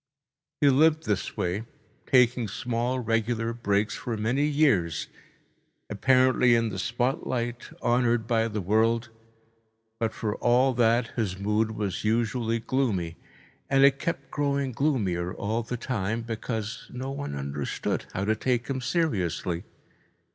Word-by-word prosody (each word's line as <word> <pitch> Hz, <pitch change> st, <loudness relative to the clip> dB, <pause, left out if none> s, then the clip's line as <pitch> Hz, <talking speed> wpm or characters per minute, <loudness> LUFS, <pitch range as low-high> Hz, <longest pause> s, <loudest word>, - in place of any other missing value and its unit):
He 145 Hz, -, +6 dB
lived 155 Hz, +3 st, +4 dB
this 105 Hz, -3 st, -2 dB
way, 90 Hz, +5 st, -1 dB, 0.4 s
taking 125 Hz, -2 st, +4 dB
small 120 Hz, +5 st, -2 dB
regular 115 Hz, 0 st, 0 dB
breaks, 105 Hz, -2 st, 0 dB
for 115 Hz, -2 st, -4 dB
many 125 Hz, +7 st, +1 dB
years, 110 Hz, -, +2 dB, 0.9 s
apparently 130 Hz, +2 st, +4 dB
in 115 Hz, -1 st, +1 dB
the 95 Hz, -2 st, -5 dB
spotlight, 120 Hz, +1 st, -2 dB
honoured 120 Hz, -1 st, +2 dB
by 115 Hz, 0 st, +1 dB
the 105 Hz, -2 st, -3 dB
world, 110 Hz, +4 st, +2 dB, 0.9 s
but 115 Hz, -1 st, 0 dB
for 105 Hz, -3 st, -3 dB
all 125 Hz, +2 st, +3 dB
that 120 Hz, 0 st, +2 dB
his 100 Hz, -6 st, -1 dB
mood 105 Hz, +3 st, 0 dB
was 100 Hz, -3 st, -2 dB
usually 115 Hz, +1 st, +1 dB
gloomy, 110 Hz, -9 st, -1 dB, 0.5 s
and 135 Hz, 0 st, +4 dB
it 140 Hz, 0 st, +5 dB
kept 170 Hz, -, -3 dB
growing 140 Hz, -2 st, 0 dB
gloomier 100 Hz, -, 0 dB
all 110 Hz, +3 st, -1 dB
the 120 Hz, +2 st, -4 dB
time, 115 Hz, -2 st, -2 dB
because 115 Hz, -1 st, -4 dB
no 130 Hz, +2 st, -5 dB
one 140 Hz, -, -4 dB
understood 70 Hz, 0 st, -3 dB
how 95 Hz, -, -2 dB
to 110 Hz, +1 st, +2 dB
take 120 Hz, +1 st, -1 dB
him 130 Hz, -1 st, -2 dB
seriously. 95 Hz, -, -1 dB
115 Hz, 135 wpm, -27 LUFS, 105-130 Hz, 0.9 s, He